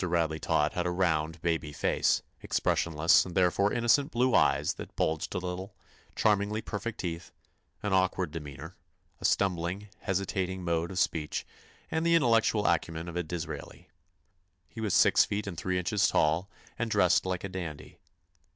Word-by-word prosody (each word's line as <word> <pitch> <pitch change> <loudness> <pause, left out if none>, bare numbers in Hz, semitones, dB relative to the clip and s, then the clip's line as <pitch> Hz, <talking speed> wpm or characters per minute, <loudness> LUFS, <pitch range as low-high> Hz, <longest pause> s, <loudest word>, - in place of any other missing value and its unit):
Radley 85 -3 0
Todd 75 0 +1
had 90 0 -1
a - - 0
round, 80 -3 0
baby 80 -3 -1
face; - - +1 0.2
expressionless 80 0 +2
and 90 -2 -8
therefore 95 +2 +3
innocent 120 +4 +3
blue 125 +1 +2
eyes - - +3
that - - -10
bulged 80 +4 -1
a - - +1
little; 90 +2 -5 0.4
charmingly 105 0 +2
perfect 110 0 -5
teeth; 85 -2 -5 0.5
an 105 -2 -1
awkward 95 -2 +1
demeanor; 75 +2 -8 0.4
a - - -5
stumbling, 95 +1 0
hesitating 95 -1 -2
mode 85 -1 0
of 95 - -7
speech 80 -4 -1 0.5
and 160 - 0
the 170 0 +4
intellectual 115 -7 +3
acumen 85 -1 0
of 85 - -7
a 90 - 0
Disraeli. 85 0 -7 0.8
He 110 - -9
was 105 -4 0
six - - +6
feet 105 0 -3
and 100 -3 -5
three 90 +3 -2
inches 95 +2 +2
tall 80 +5 +1 0.3
and 115 -1 -1
dressed 100 -5 +3
like 90 -1 -2
a 100 - -4
dandy. 85 -5 -7
90 Hz, 160 wpm, -29 LUFS, 85-100 Hz, 0.8 s, six